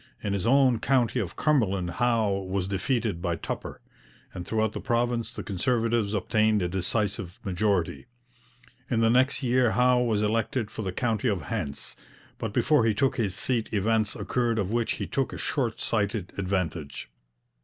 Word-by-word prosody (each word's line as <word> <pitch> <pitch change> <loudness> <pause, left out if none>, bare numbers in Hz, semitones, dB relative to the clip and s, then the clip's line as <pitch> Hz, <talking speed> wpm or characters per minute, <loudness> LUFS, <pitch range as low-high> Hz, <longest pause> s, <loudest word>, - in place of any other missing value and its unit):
In 100 -2 -1
his 100 +2 -1
own 130 -2 +4
county 125 -2 +2
of 95 -7 -4
Cumberland 100 - +1
Howe 115 +1 +1 0.2
was 95 -1 -1
defeated 100 -2 -1
by 85 -2 0
Tupper, - - -6 0.5
and 90 -1 -7
throughout 110 -1 0
the - - -4
province 120 0 0
the - - -5
Conservatives 115 +1 0
obtained 110 0 +2
a - - +1
decisive 95 0 -2
majority. 95 +1 0 0.8
In 115 -2 +1
the 115 0 +4
next 130 +3 +3
year 125 -1 +3
Howe 125 0 +4
was 110 -4 +1
elected 110 +1 0
for - - -5
the 95 -3 -2
county 115 +3 -1
of 100 -5 0
Hants, 90 -12 -4 0.4
but 115 -4 -3
before 125 +4 +3
he 110 -2 +2
took 135 +3 +1
his 100 -6 0
seat 120 -4 0
events 110 +1 +1
occurred 120 -2 0
of 100 -2 -1
which 120 -1 +1
he - - -4
took 135 -1 -2
a - - -5
short 120 -6 -2
sighted 105 -3 -1
advantage. 90 -6 -3
110 Hz, 165 wpm, -27 LUFS, 100-120 Hz, 0.8 s, own